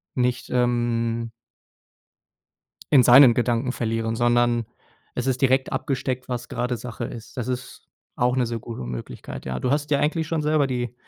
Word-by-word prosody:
nicht, 125 -1 0
ähm 120 -2 0 1.6
in 135 -4 +8
seinen 125 +1 +8
Gedanken 120 +1 0
verlieren, 115 -2 -2
sondern 120 -1 +2 0.5
es 125 - -3
ist 130 -1 0
direkt 130 -1 +2
abgesteckt, 130 -2 -2
was 125 -1 -4
gerade 125 0 -2
Sache 120 0 -6
ist. 115 +2 -10
Das 125 0 -3
ist 125 0 -6 0.3
auch 125 +1 +1
'ne 125 - +2
sehr 115 0 -3
gute 115 - -7
Möglichkeit. 60 +1 -7
Ja, 65 -1 -3
du 125 - 0
hast 145 +1 +1
dir 145 - +3
eigentlich 155 +2 0
schon 160 -1 -1
selber 150 -1 +2
die 125 -2 -3
125 Hz, 165 wpm, -24 LUFS, 115-130 Hz, 1.6 s, in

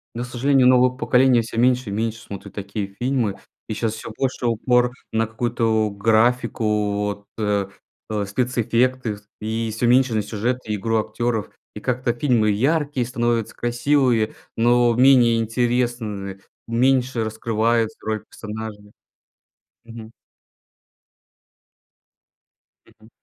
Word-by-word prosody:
Ну, 120 - -3
к - - -5
сожалению, 130 +1 +2
новое 125 0 +5
поколение 125 -2 +3
всё 115 0 -7
меньше 125 -1 +2
и - - -4
меньше 115 +1 -2
смотрит 100 -3 -9
такие 100 0 -4
фильмы, 120 -5 0 0.3
и - - -1
щас 110 0 -1
всё 115 - -8
больше 130 -2 -2
упор 125 +2 +2 0.2
на 110 0 +2
какую-то 110 -1 0
графику, 115 +4 +1 0.4
вот, 100 0 -4
э, 105 -3 0 0.4
э, 105 -2 -1
спецэффекты, 120 +1 0 0.2
и 110 +1 -2
всё 120 +2 0
меньше 125 0 +4
на 110 - +1
сюжет 110 +4 -2
и 105 - -2
игру 115 +3 0
актёров. 115 0 -2 0.3
И 105 - -6
как-то 125 +1 -1
фильмы 120 -4 +2
яркие 140 +3 0
становятся, 120 -2 -1
красивые, 120 -2 +1 0.2
но 120 +1 +4
менее 125 -3 +5
интересные, 115 -4 -1 0.3
меньше 125 0 +2
раскрываются 110 +1 0
роли 110 0 -1
персонажей. 105 -1 -8 0.9
Мгм. 115 -1 -11 2.8
Мгм. 110 +1 -21
115 Hz, 120 wpm, -22 LUFS, 110-125 Hz, 2.8 s, новое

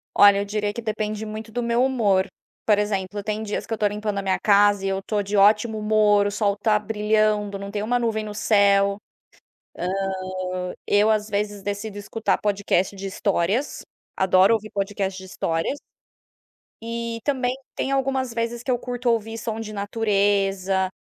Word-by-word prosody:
Olha, 200 -1 +7
eu 200 - -1
diria 205 0 -1
que 235 - -6
depende 215 -1 -3
muito 215 +1 -7
do 245 +2 -2
meu 235 +1 +2
humor. 210 -8 +2 0.4
Por 210 -2 +5
exemplo, 205 -1 -2
tem 215 +1 -2
dias 210 -1 -3
que - - -4
eu - - +1
estou 210 -1 +1
limpando 210 -1 -3
a - - -2
minha 190 -1 0
casa 205 -1 +4
e - - +1
eu 195 0 -1
estou 205 +1 -2
de 200 +1 -3
ótimo 215 +2 +4
humor. 210 -1 +3
O - - -2
sol 205 -1 +1
está 210 +1 +2
brilhando, 210 -1 0
não 200 0 -7
tem 205 0 -3
uma 240 +4 +1
nuvem 225 -2 -1
no 210 -1 -6
céu, 200 -2 +3 1.6
ah, 180 0 -4
eu 205 +2 +4
às 215 -1 +1
vezes 205 -1 -2
decido 205 +1 -4
escutar 215 +2 -1
podcast 200 -2 0
de 195 0 -6
histórias. 200 +5 -1 0.3
Adoro 190 +3 +4
ouvir 215 -1 -3
podcast 195 -1 -2
de 190 - -9
histórias. 165 - -2 1.0
E 230 0 -4
também 255 -3 0 0.2
tem 270 - -2
algumas 265 -2 0
vezes 230 +1 -3
que 260 - -1
eu 245 - +2
curto 245 0 -2
ouvir 225 -1 0
som 225 -1 -4
de 220 -1 -6
natureza 200 -2 +1
210 Hz, 175 wpm, -23 LUFS, 200-225 Hz, 1.6 s, Olha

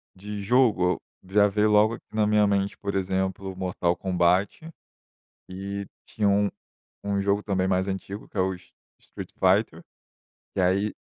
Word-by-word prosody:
de 105 +2 -6
jogo, 105 -5 +3 0.3
o, 95 - -15
já 105 0 +6
veio 105 +1 +2
logo 105 +2 +4
aqui - - -17
na 110 -1 +2
minha 105 -1 +4
mente, 100 0 0
por 100 -1 -4
exemplo, 95 0 -2
Mortal 90 -2 -1
Kombat, 95 - 0 0.8
e 100 +1 -5 0.2
tinha 105 -2 0
um 100 0 +3 0.6
um 100 -1 0
jogo 100 +1 +1
também, 95 -2 0
mais 95 +1 +1
antigo, 95 +2 -5
que - - -28
é - - -1
o 95 +1 +1
s 90 - -18 0.3
Street - - -10
Fighter. - - +2 0.7
E, - - +1
aí, 95 +3 +1
100 Hz, 160 wpm, -26 LUFS, 95-105 Hz, 0.8 s, já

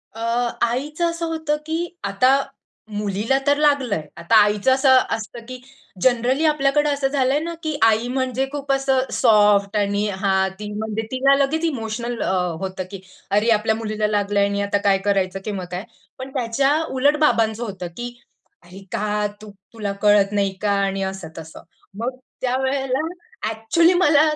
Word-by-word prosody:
अ, - - -9 0.4
आईचं 295 +8 0
असं 335 0 -3
होतं, 320 -2 -1
की 335 +2 -3
आता 255 +8 +3 0.5
मुलीला 210 +4 0
तर 285 0 +4
लागलंय. 280 - +2 0.2
आता 170 +7 +1
आईचं 210 +4 +1
असं 265 0 +5 0.2
असतं, 225 +2 -8
की 255 0 -7 0.4
जनरली 255 - +2
आपल्याकडे 295 -1 +2
असं 280 -1 0
झालंय 270 0 +1
न, 335 +2 -4
की 310 -2 -2
आई 225 +1 +3
म्हणजे 260 0 -1
खूप 285 -1 -3
असं 270 -1 +1
सॉफ्ट 210 -3 +4
आणि 205 0 0
हां, 190 -1 +1
ती 210 -1 -6
म्हणजे 220 +1 -3
तिला 270 +2 +4
लगेच 280 +4 0
इमोशनल 235 -4 -3
अ, - - -1 0.3
होतं 190 -1 -4
की 195 - -7 0.3
"अरे! 210 +3 +2
आपल्या 220 0 +2
मुलीला 215 -1 -2
लागलंय 205 -1 +1
आणि 200 0 -1
आता 200 0 0
काय 195 -1 +5
करायचं? 195 -2 0
किंवा 200 -4 -4
काय?" 180 +2 -4 0.4
पण 260 +1 -6
त्याच्या 270 +3 +1
उलट 285 +3 +2
बाबांचं, 225 -6 +2
होतं 195 -5 -5
की 240 0 -5 0.5
"अरे 185 +3 -13
का? 210 0 -1
तुला 205 0 -7
कळत 205 -1 +4
नाही 200 -1 0
का?" 210 -1 +1
आणि 195 0 -2
असं 190 -3 -5
तसं. 160 0 -10 0.4
मग 250 +3 -3 0.2
त्यावेळेला 265 +2 0 0.4
ॲक्चुअली 330 +11 +2
मला 310 -5 +4
230 Hz, 160 wpm, -21 LUFS, 205-275 Hz, 0.5 s, असं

